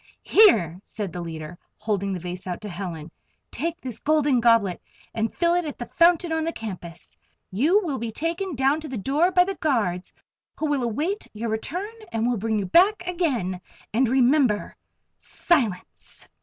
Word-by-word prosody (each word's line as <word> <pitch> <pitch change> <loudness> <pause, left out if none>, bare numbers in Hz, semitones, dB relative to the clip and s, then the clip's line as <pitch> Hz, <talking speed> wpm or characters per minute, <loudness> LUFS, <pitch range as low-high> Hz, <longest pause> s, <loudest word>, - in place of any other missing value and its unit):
"Here," 200 - +5
said 205 -3 -6
the 180 - -4
leader, 160 0 -7 0.2
holding 200 -2 -1
the 185 - -3
vase 180 +2 -7
out 180 - -3
to 210 - -6
Helen. 170 -4 -6 0.4
"Take 330 +5 -3
this 250 -4 -7
Golden 295 -4 +2
Goblet 230 -6 +3 0.3
and 225 0 -1
fill 340 0 +1
it 355 0 +1
at 300 -3 -6
the 240 - -5
fountain 340 +2 +3
on 320 0 0
the 330 - -1
campus. 180 - -8 0.4
You 300 - +3
will 290 -7 -3
be 230 0 -3
taken 335 - -3
down 270 +4 +2
to 310 - -7
the 260 -4 -5
door 285 - +2
by 360 0 +5
the 390 +2 -3
guards, 220 - -1 0.5
who 315 - -2
will 290 -3 0
await 300 - -2
your 225 +2 -3
return 350 - -3 0.2
and 225 0 -1
will 245 -1 +1
bring 220 +1 -1
you 200 - -1
back 370 - +4
again. 255 - -1 0.3
And 245 +2 +2
remember! 255 -3 +2 0.4
Silence!" 240 - -2
245 Hz, 175 wpm, -24 LUFS, 200-325 Hz, 0.5 s, Here